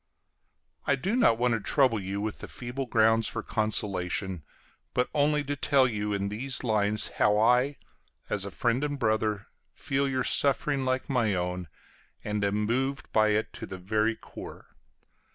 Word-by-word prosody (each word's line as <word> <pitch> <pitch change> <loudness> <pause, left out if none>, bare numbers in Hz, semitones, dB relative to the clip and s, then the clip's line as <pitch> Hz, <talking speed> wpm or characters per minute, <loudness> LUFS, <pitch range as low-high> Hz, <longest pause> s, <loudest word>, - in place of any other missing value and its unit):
I 140 - +4
do 190 - -1
not 230 - +4
want 120 0 +2
to 115 - 0
trouble 125 0 +2
you 95 +1 -4
with 110 0 -4
feeble 125 +2 -5
grounds 115 0 +3
for - - -3
consolation, 95 -4 -2 0.5
but 125 - +1
only 150 0 +2
to 145 +1 -3
tell 135 -1 +3
you 105 -3 -2
in 100 -1 -1
these 130 +6 +1
lines 105 -2 0
how 105 0 +4
I, 125 +6 +3 0.5
as 105 -2 -1
friend 120 +6 0
and 145 -1 -2
brother, 110 -4 0 0.3
feel 140 0 -1
your 130 -1 0
suffering 140 0 +2
like 130 0 -1
my 120 -7 +1
own, 90 0 -3 0.6
and 105 -1 -2
am 100 +1 +1
moved 135 +4 -1
by 110 -1 +4
it 105 +1 0
to - - -7
the 95 - -7
very 110 +4 0
core. - - -11
115 Hz, 160 wpm, -28 LUFS, 105-135 Hz, 0.6 s, I